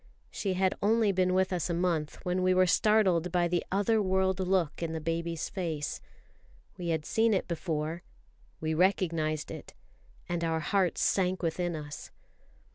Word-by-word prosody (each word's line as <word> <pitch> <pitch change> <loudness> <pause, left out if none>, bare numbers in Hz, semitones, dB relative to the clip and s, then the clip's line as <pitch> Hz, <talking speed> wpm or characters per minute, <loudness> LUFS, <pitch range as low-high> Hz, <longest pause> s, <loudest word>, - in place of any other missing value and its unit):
She 195 -3 -2
had 190 0 +2
only 215 0 +3
been 185 -1 +1
with 190 0 +2
us 175 -1 -1
a 170 - 0
month 170 -4 -1
when 180 +1 0
we 185 0 +3
were 185 0 +5
startled 185 -3 +3
by 175 -1 +2
the 175 0 0
other 205 +3 +2
world 190 -1 +1
look 185 -5 0
on 165 -1 -2
the 160 - -2
baby's 165 +1 -2
face. 165 -6 -3 0.7
We 175 - -6
had 160 -2 -1
seen 225 -1 +2
it 185 - -1
before; 160 -1 -3 0.6
we 160 0 -1
recognised 160 -3 +1
it, - - -9 0.5
and 175 -1 -2
our 165 -1 0
hearts 185 +2 +1
sank 185 -1 +1
within 170 +1 -1
us. 150 -1 -7
180 Hz, 165 wpm, -30 LUFS, 165-190 Hz, 0.7 s, were